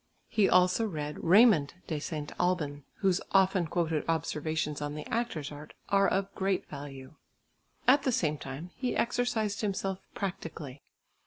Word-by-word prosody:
He 205 -3 +3
also 185 +5 +4
read 150 -5 -5
Raymond 185 -5 +6
de 155 -3 -2
St. 150 -1 -5
Albin, 150 -6 0 0.2
whose 190 -2 +3
often 190 -2 +4
quoted 160 -2 0
observations 155 -1 -1
on 145 0 -3
the 150 - -6
actor's 220 -12 -2
art 150 +1 -10
are 195 0 +4
of 195 0 0
great 190 -1 -1
value. 140 -2 -8 0.7
At 275 +3 +7
the 265 - +1
same 155 -9 0
time 140 +7 -7
he 250 -1 -2
exercised 225 -4 0
himself 195 -2 -1 0.2
practically. 165 -8 -5
170 Hz, 145 wpm, -30 LUFS, 150-195 Hz, 0.7 s, At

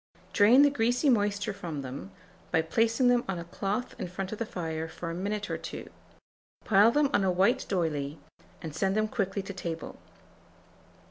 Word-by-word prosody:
Drain 235 +7 +7
the 285 - +5
greasy 245 +2 +2
moisture 205 -1 +1
from 160 -7 -5
them, 130 -6 -7 0.4
by 160 - +2
placing 225 +9 +2
them 245 -1 +4
on 190 -2 -2
a 170 - -5
cloth 200 +7 -3
in - - -3
front 185 +2 -5
of 215 - -5
the 230 - -2
fire 160 -4 -4
for 165 +1 -6
a - - -4
minute 205 +4 -3
or - - -3
two; - - -7 0.7
pile 205 +1 +6
them 290 +2 +2
on 200 - +3
a 190 - +2
white 195 +8 +2
d'oyley, 155 -6 -1 0.5
and 160 -2 -5
send 190 +5 0
them 215 0 +2
quickly 200 -2 -2
to 200 - -7
table. 170 -3 -6
195 Hz, 185 wpm, -29 LUFS, 170-225 Hz, 0.7 s, Drain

